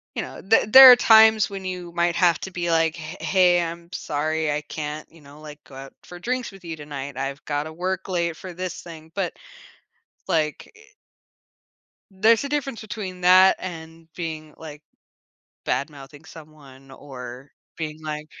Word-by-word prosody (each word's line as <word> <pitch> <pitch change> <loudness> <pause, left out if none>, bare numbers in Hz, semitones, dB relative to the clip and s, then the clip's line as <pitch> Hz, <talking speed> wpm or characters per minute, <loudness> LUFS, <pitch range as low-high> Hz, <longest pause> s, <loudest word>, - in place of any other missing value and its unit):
you - - -2
know, - - -9
there 220 +4 +3
there 260 +3 +11
are - - +9
times 220 -3 +6
when 195 -1 -7
you 180 -2 -6
might 170 0 0
have 175 -3 +3
to 190 - -6
be 175 -1 -3
like, 165 0 +1
"H 155 +4 -8
Hey, 180 -2 +3
I'm 170 0 -7
sorry, 155 -1 -2
I 145 - -1
can't, 150 0 -7
you 165 - -20
know, 145 +1 -16
like, 150 -1 -12
go 135 - -16
out 135 0 -10
for 175 - -12
drinks 250 +4 -3
with 195 -2 -16
you 165 -1 -5
tonight, 145 -2 -8
I've 135 +3 -5
gotta 150 +1 -3
work 185 +3 -4
late 170 -2 -1
for 185 - -9
this 180 +1 -6
thing." 160 -1 -12
But, 190 -4 -2 1.0
like, 155 -2 -1
eh - - -18 1.3
there's 220 +5 +3
a 280 - -5
difference 275 -5 -3
between 205 -4 -7
that 185 +1 +6
and 165 -2 -9
being, 155 -3 -6
like, 150 -2 -11 0.8
bad-mouthing 145 +1 -5
someone 145 -4 -15
or 130 -1 -10 0.3
being 155 -1 -6
like 150 -1 -5
165 Hz, 170 wpm, -23 LUFS, 150-185 Hz, 1.3 s, there